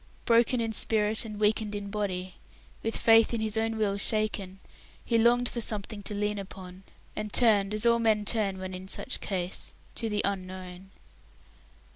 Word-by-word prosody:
Broken 235 Hz, +1 st, +3 dB
in 225 Hz, -1 st, -1 dB
spirit 215 Hz, +1 st, +1 dB
and 210 Hz, -2 st, -7 dB
weakened 210 Hz, 0 st, +1 dB
in 200 Hz, -1 st, -5 dB
body, 185 Hz, -3 st, -3 dB, 0.5 s
with 225 Hz, -, -1 dB
faith 225 Hz, +1 st, +5 dB
in -, -, -2 dB
his 220 Hz, 0 st, +1 dB
own 225 Hz, 0 st, 0 dB
will 200 Hz, -2 st, 0 dB
shaken, 200 Hz, -3 st, 0 dB, 0.5 s
he 230 Hz, -1 st, +2 dB
longed 240 Hz, +2 st, +4 dB
for 240 Hz, -, -3 dB
something 210 Hz, -1 st, -3 dB
to 205 Hz, +1 st, -6 dB
lean 210 Hz, 0 st, -1 dB
upon, 185 Hz, -1 st, -10 dB, 0.3 s
and 215 Hz, 0 st, -4 dB
turned 210 Hz, -5 st, +4 dB
as 215 Hz, +2 st, +2 dB
all 235 Hz, 0 st, +4 dB
men 215 Hz, -2 st, +2 dB
turn 205 Hz, -3 st, 0 dB
when 185 Hz, 0 st, -6 dB
in 185 Hz, +1 st, -8 dB
such -, -, -3 dB
case 185 Hz, -2 st, -3 dB, 0.2 s
to 230 Hz, -, -2 dB
the 210 Hz, -1 st, -1 dB
Unknown. 185 Hz, -1 st, -5 dB
210 Hz, 170 wpm, -28 LUFS, 195-225 Hz, 0.5 s, faith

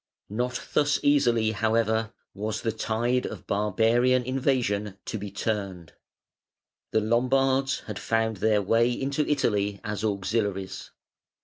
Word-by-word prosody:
] -, -, -56 dB
(568) 105 Hz, -, -8 dB, 0.3 s
Not -, -, -22 dB
thus 145 Hz, 0 st, +3 dB
easily, 120 Hz, -6 st, +3 dB
however, 110 Hz, 0 st, +1 dB, 0.2 s
was 105 Hz, +2 st, -3 dB
the 115 Hz, -, +1 dB
tide 120 Hz, +4 st, 0 dB
of -, -, -8 dB
barbarian 115 Hz, +5 st, +2 dB
invasion 120 Hz, -6 st, 0 dB
to 110 Hz, -, -4 dB
be 100 Hz, 0 st, -5 dB
turned. 100 Hz, -5 st, -3 dB, 1.0 s
The 110 Hz, -, +1 dB
Lombards 130 Hz, +4 st, +2 dB
had 105 Hz, -4 st, -7 dB
found 115 Hz, -1 st, 0 dB
their 105 Hz, +1 st, +2 dB
way 115 Hz, +4 st, +3 dB
into 140 Hz, +4 st, -1 dB
Italy 105 Hz, -8 st, +1 dB
as 105 Hz, -1 st, -4 dB
auxiliaries. 100 Hz, -2 st, -2 dB
110 Hz, 130 wpm, -26 LUFS, 105-125 Hz, 1.0 s, thus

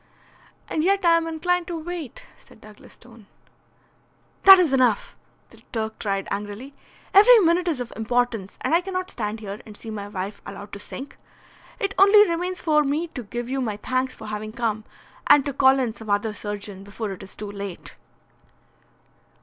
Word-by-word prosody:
"And 310 Hz, -, -1 dB
yet 390 Hz, +1 st, +2 dB
I 335 Hz, -1 st, +6 dB
am 330 Hz, 0 st, 0 dB
inclined 350 Hz, +2 st, -1 dB
to 345 Hz, -, -4 dB
wait," 325 Hz, -5 st, -7 dB
said -, -, -19 dB
Douglas 215 Hz, -1 st, -15 dB
Stone. 230 Hz, -3 st, -17 dB, 1.2 s
"That 385 Hz, 0 st, +12 dB
is 340 Hz, -7 st, +2 dB
enough!" 250 Hz, -5 st, +2 dB, 0.4 s
the -, -, -16 dB
Turk 220 Hz, -2 st, -4 dB
cried, 195 Hz, -2 st, -2 dB
angrily. 205 Hz, +7 st, -5 dB, 0.4 s
"Every 435 Hz, +5 st, +8 dB
minute 355 Hz, -2 st, +3 dB
is 315 Hz, -6 st, 0 dB
of 245 Hz, -1 st, -6 dB
importance, 225 Hz, -3 st, -1 dB
and -, -, -1 dB
I 340 Hz, -, +4 dB
cannot 370 Hz, 0 st, -4 dB
stand 215 Hz, -1 st, -4 dB
here 205 Hz, 0 st, -7 dB
and 210 Hz, -2 st, -12 dB
see 225 Hz, -, -8 dB
my 205 Hz, -2 st, -6 dB
wife 200 Hz, 0 st, -6 dB
allowed 200 Hz, +1 st, -9 dB
to 200 Hz, -, -6 dB
sink. 275 Hz, +6 st, -9 dB, 0.6 s
It 395 Hz, 0 st, -1 dB
only 410 Hz, +2 st, +7 dB
remains 355 Hz, +2 st, -2 dB
for 300 Hz, -3 st, +3 dB
me 300 Hz, +4 st, -1 dB
to 275 Hz, -, -6 dB
give 240 Hz, +2 st, -6 dB
you 265 Hz, +1 st, -2 dB
my 215 Hz, -5 st, -2 dB
thanks 255 Hz, +4 st, -2 dB
for 220 Hz, -, -11 dB
having 215 Hz, 0 st, -5 dB
come, 220 Hz, -2 st, -2 dB, 0.4 s
and 290 Hz, -1 st, +6 dB
to 280 Hz, -, -2 dB
call 265 Hz, +1 st, +5 dB
in 250 Hz, -4 st, -1 dB
some 220 Hz, -1 st, -11 dB
other 205 Hz, +2 st, 0 dB
surgeon 205 Hz, -2 st, -6 dB
before 205 Hz, +1 st, -5 dB
it 190 Hz, -, -8 dB
is 195 Hz, -, -12 dB
too 205 Hz, -1 st, -7 dB
late." 200 Hz, -3 st, -8 dB
245 Hz, 180 wpm, -24 LUFS, 210-330 Hz, 1.2 s, That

